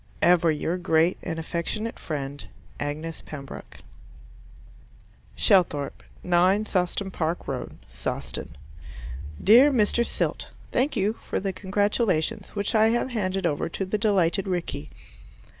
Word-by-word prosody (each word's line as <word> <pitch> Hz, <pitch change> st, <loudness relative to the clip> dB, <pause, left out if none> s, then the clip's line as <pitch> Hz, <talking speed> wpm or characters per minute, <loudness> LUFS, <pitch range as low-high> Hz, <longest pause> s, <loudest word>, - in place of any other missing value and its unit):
Ever 175 Hz, -1 st, +5 dB
your 160 Hz, +3 st, 0 dB
grateful 165 Hz, +1 st, +1 dB
and 165 Hz, -, -3 dB
affectionate 170 Hz, +7 st, -3 dB
friend, 145 Hz, -2 st, -5 dB, 0.3 s
Agnes 155 Hz, +3 st, -4 dB
Pembroke 140 Hz, -3 st, -9 dB, 1.5 s
Shelthorpe, 175 Hz, -9 st, +2 dB, 0.2 s
9 185 Hz, +4 st, +3 dB
Sawston 190 Hz, 0 st, -1 dB
Park 165 Hz, 0 st, -2 dB
Road 130 Hz, -2 st, -4 dB
Sawston -, -, -5 dB, 0.9 s
Dear 250 Hz, +8 st, +8 dB
Mr. 235 Hz, -1 st, +3 dB
Silt, -, -, -2 dB, 0.2 s
Thank 270 Hz, +4 st, +1 dB
you 205 Hz, +3 st, +2 dB
for -, -, -4 dB
the 195 Hz, 0 st, -2 dB
congratulations, 205 Hz, -3 st, 0 dB
which 205 Hz, 0 st, -1 dB
I 220 Hz, 0 st, +5 dB
have 240 Hz, +3 st, 0 dB
handed 195 Hz, -4 st, -1 dB
over 150 Hz, -1 st, 0 dB
to 195 Hz, -, -3 dB
the 205 Hz, +3 st, -1 dB
delighted 195 Hz, -3 st, +2 dB
Rickie. 175 Hz, -, -3 dB
185 Hz, 120 wpm, -26 LUFS, 160-210 Hz, 1.5 s, Dear